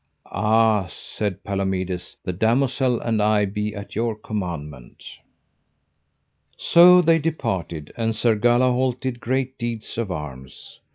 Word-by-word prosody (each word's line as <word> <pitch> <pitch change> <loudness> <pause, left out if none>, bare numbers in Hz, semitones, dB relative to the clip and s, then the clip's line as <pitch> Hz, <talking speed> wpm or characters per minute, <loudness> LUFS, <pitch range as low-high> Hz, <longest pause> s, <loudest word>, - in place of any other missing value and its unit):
Ah, 110 -1 +2
said 100 +3 -5
Palomides, 95 -2 -3
the 90 - -2
damosel 125 +4 +1
and 110 -2 0
I 105 0 +3
be 105 +2 -3
at 100 0 -9
your 115 0 -1
commandment. 85 - -6 1.5
So 180 +1 +6
they 165 0 +4
departed, 95 - -3
and 115 -1 -1
Sir 115 -1 +2
Galahalt 125 +2 +2
did 130 -2 -4
great 130 +2 -2
deeds 115 -2 -5
of 115 -4 -2
arms. 70 -6 -8
110 Hz, 120 wpm, -22 LUFS, 95-125 Hz, 1.5 s, So